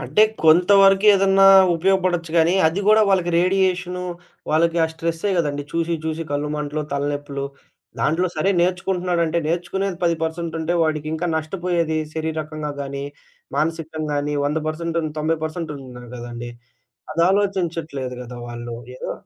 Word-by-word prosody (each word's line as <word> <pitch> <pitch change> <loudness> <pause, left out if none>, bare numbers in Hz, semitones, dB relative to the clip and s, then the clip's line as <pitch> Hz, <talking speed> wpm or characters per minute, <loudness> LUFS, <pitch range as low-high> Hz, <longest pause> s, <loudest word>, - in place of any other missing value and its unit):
అంటే 215 - +3 0.2
కొంతవరకేదన్నా 195 +3 +6 0.3
ఉపయోగపడొచ్చు 180 -1 +1
గానీ, 165 +2 +4
అది 165 +5 0
గూడా 215 +1 +6
వాళ్ళకి 180 -2 +2
రేడియేషను, 185 0 +1 0.5
వాళ్ళకి 165 +2 +2
ఆ - - +2
స్ట్రెస్సే 165 +4 -2
గదండీ 145 -3 -1
చూసి, 165 0 0
చూసి 160 +1 -2
కళ్ళు 145 +1 -1
మంటలు, 150 +1 -3
తలనొప్పులు. 145 0 -3 0.6
దాంట్లో 175 +4 +1
సరే 190 +6 +2
నేర్చుకుంటున్నాడంటే 175 -2 0
నేర్చుకునేది 180 +2 -2
10% 165 0 -1
ఉంటే 170 +2 -1
వాడికి 155 -1 -1
ఇంకా 170 +2 -2
నష్టపోయేది 170 -1 -1 0.2
శరీరకంగా 155 -2 -3
గానీ, 140 0 -5 0.5
మానసికంగా 160 -1 -2
గాని, 145 +1 -1
100 150 +2 0
పర్సెం‌టున్ 165 0 -2
90% 160 +1 0
పర్సెంట్ 160 -1 -4
ఉన్నారు 125 -3 -11
గదండీ. 120 0 -7 0.6
అది 165 - +1
ఆలోచించట్లేదు 170 -9 -1
గదా 125 0 -9
వాళ్ళు! 120 0 -6 0.2
ఏదో - - -5
165 Hz, 130 wpm, -21 LUFS, 150-180 Hz, 0.6 s, కొంతవరకేదన్నా